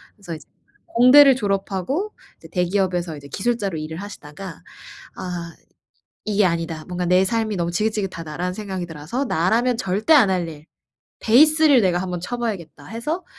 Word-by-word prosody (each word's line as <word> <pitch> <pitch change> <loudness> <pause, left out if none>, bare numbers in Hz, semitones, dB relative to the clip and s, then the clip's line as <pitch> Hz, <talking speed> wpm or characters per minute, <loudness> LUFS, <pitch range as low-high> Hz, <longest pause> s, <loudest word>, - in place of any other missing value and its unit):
그래서 185 -6 -7
이제 155 - -13 0.4
공대를 270 0 +7
졸업하고 205 - -2 0.2
이제 - - -14
대기업에서 180 -2 0
이제 140 - -11
기술자로 200 0 -2
일을 155 +1 -6
하시다가 185 -2 -9 0.5
'아 175 -2 -6 0.7
이게 210 -1 +2
아니다. 165 -2 -2
뭔가 180 0 -3
내 180 +2 +4
삶이 220 0 -1
너무 170 -1 -1
지긋지긋하다.'라는 180 -4 -2
생각이 190 -3 -5
들어서 165 - -4
'나라면 225 +7 +1
절대 210 - +1
안 255 -10 +6
할 180 -3 0
일 155 -1 -10 0.6
베이스를 300 +3 +5
내가 180 -2 +2
한번 180 -1 -3
쳐봐야겠다.' 190 -10 -5
해서 300 +11 -4
190 Hz, 365 characters per minute, -22 LUFS, 170-230 Hz, 0.7 s, 공대를